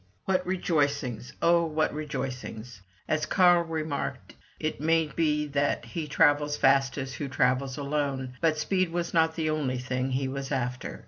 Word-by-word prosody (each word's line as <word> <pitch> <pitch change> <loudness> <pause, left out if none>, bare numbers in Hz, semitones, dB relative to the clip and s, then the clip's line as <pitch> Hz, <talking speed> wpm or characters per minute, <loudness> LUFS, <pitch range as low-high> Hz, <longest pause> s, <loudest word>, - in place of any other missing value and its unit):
What 185 -1 +1
rejoicings, 145 - 0
oh, 170 0 +5
what 155 -1 0
rejoicings! 125 -7 -5 0.3
As 155 0 0
Carl 175 -1 +5
remarked, 160 -3 -4 0.3
it 155 -2 -3
may 165 +1 +3
be 150 -1 0
that 140 0 0
"He 165 -3 -5
travels 145 0 +3
fastest 135 0 +2
who 145 - -3
travels 130 0 +1
alone"; 140 -3 -2
but 160 -2 +2
speed 185 +3 0
was 170 0 -2
not 160 -1 +3
the 155 -2 0
only 140 -5 -1
thing 130 +1 -2
he 130 +1 -1
was 135 +1 -5
after. 125 -2 -3
145 Hz, 150 wpm, -28 LUFS, 135-160 Hz, 0.3 s, oh